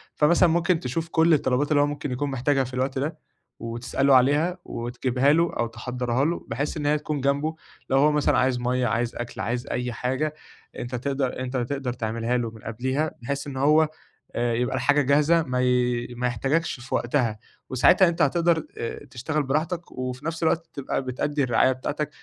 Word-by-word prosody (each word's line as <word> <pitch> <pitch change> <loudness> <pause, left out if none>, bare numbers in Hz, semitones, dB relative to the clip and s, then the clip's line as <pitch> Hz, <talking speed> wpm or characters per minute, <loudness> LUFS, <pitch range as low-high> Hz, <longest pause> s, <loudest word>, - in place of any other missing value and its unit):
فمثلًا 170 +3 +4
ممكن 170 +1 +2
تشوف 160 +6 -3
كل 165 +1 +4
الطلبات 145 0 +1
اللي 145 -1 +5
هو - - +4
ممكن 145 -1 -4
يكون 140 +3 -2
محتاجها 135 +1 +1
في 130 0 -8
الوقت 130 +1 -1
ده 155 +4 -2 0.4
وتسأله 120 +4 +1
عليها 145 +8 +3
وتجيبها 125 +3 0
له 165 +2 +2
أو 120 - +1
تحضَّرها 125 +2 -2
له 170 +2 -2
بحيث 140 +8 -2
إن 150 - -3
هي 150 +1 +3
تكون 150 -1 -3
جنبُه، 140 +4 0 0.3
لو 135 - +3
هو 150 +2 +5
مثلًا 150 -1 +2
عايز 130 -1 +2
َمَيّة، 125 +1 0
عايز 115 +1 -1
أكْل، 120 0 -5
عايز 120 +1 -2
أي 125 0 -2
حاجة 130 +6 -1 0.5
أنت 125 +1 -4
تقدَر 135 +1 -2
أنت 130 0 -3
تقدَر 130 0 -2
تعملها 115 +1 -1
له 120 -2 -2
من 110 -1 -13
قبليها، 130 +7 -2
بحيث 140 +3 -3
إن 135 -2 -6
هو 150 +3 +4 0.5
أ 120 0 +1
يبقى 125 +2 0
الحاجة 145 0 +3
جاهزة 150 +5 +3
ما 125 -3 -1
ي 125 -1 +1
ما 125 +1 0
يحتاجكش 135 +6 -1
في 130 - -3
وقتها، 120 -4 0 0.3
وساعتها 130 +8 +5
أنت 170 -1 -1
هتقدَر 165 +2 +2
أ 115 - -5
تشتغل 145 +5 -2
براحتك 160 +5 -2
وفي 130 +2 -5
نفس 165 +1 -3
الوقت 165 +1 +1
تبقى 140 -1 -2
بتأدّي 140 +3 -1
الرعاية 130 +1 +3
بتاعتك 145 +3 -3
135 Hz, 185 wpm, -25 LUFS, 125-150 Hz, 0.5 s, اللي